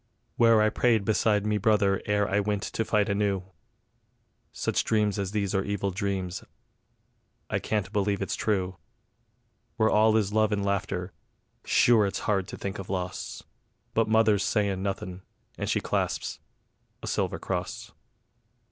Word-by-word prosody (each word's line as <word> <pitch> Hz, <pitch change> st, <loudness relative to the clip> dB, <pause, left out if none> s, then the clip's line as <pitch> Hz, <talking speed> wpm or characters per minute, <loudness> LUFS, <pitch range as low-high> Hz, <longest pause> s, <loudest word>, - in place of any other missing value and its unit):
Where 115 Hz, -2 st, +5 dB
I 110 Hz, -, +3 dB
prayed 110 Hz, -3 st, +2 dB
beside 105 Hz, -1 st, +2 dB
me 105 Hz, -1 st, +1 dB
brother 100 Hz, -2 st, +2 dB
ere 105 Hz, -1 st, +2 dB
I 100 Hz, -, +1 dB
wint 105 Hz, 0 st, -1 dB
to 115 Hz, -, -2 dB
fight 105 Hz, -2 st, +1 dB
anew: 100 Hz, -2 st, 0 dB, 1.1 s
Such -, -, -1 dB
dreams 105 Hz, -2 st, +1 dB
as 100 Hz, -2 st, -1 dB
these 100 Hz, -1 st, -1 dB
are 95 Hz, -1 st, +1 dB
evil 100 Hz, -1 st, -2 dB
dreams; 95 Hz, -1 st, -3 dB, 1.1 s
I -, -, +1 dB
can't 105 Hz, -2 st, -2 dB
believe 100 Hz, -1 st, +1 dB
it's 100 Hz, -, -2 dB
true. 95 Hz, -4 st, -1 dB, 1.0 s
Where 110 Hz, -, +3 dB
all 110 Hz, +1 st, +5 dB
is 105 Hz, -2 st, 0 dB
love 110 Hz, 0 st, +3 dB
and 100 Hz, -1 st, 0 dB
laughter, 95 Hz, -2 st, -2 dB, 0.5 s
sure 110 Hz, -4 st, +4 dB
it's 95 Hz, -, -3 dB
hard 95 Hz, -3 st, +1 dB
to -, -, -7 dB
think 100 Hz, -1 st, -5 dB
of 95 Hz, -, -7 dB
loss... 90 Hz, -2 st, -4 dB, 0.5 s
But 115 Hz, -1 st, +2 dB
mother's 110 Hz, -3 st, +4 dB
sayin' 100 Hz, -2 st, 0 dB
nothin', 95 Hz, -2 st, -4 dB, 0.3 s
and -, -, -3 dB
she -, -, +2 dB
clasps -, -, -2 dB, 0.6 s
A -, -, -4 dB
SILVER -, -, -1 dB
CROSS. 105 Hz, +4 st, -4 dB
100 Hz, 150 wpm, -27 LUFS, 95-110 Hz, 1.1 s, Where